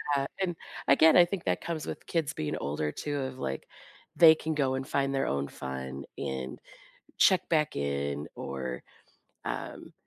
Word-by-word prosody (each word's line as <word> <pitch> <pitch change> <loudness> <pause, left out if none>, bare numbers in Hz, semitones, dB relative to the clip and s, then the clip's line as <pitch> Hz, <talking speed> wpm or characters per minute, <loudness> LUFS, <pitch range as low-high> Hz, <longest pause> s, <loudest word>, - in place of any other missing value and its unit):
Yeah, 135 - +1 0.2
and, 180 -2 0 0.3
again, 160 +4 +7
I 175 - +9
think 180 0 -4
that 90 -1 +1
comes 165 -3 -3
with - - -6
kids 160 -2 0
being 75 - -2
older, 75 +1 -2
too, 145 - -3
of, 130 -1 -4
like, 65 0 -3 0.5
they 160 -2 +9
can 160 0 -3
go 135 -3 +1
and 130 0 -3
find 140 0 0
their 135 - +1
own 70 0 0
fun 65 0 -6
and 65 -1 -4 0.6
check 185 - +5
back 155 -3 +2
in, 70 0 -2
or, 65 -2 -5 0.6
um, - - -5
130 Hz, 165 wpm, -29 LUFS, -, 0.6 s, I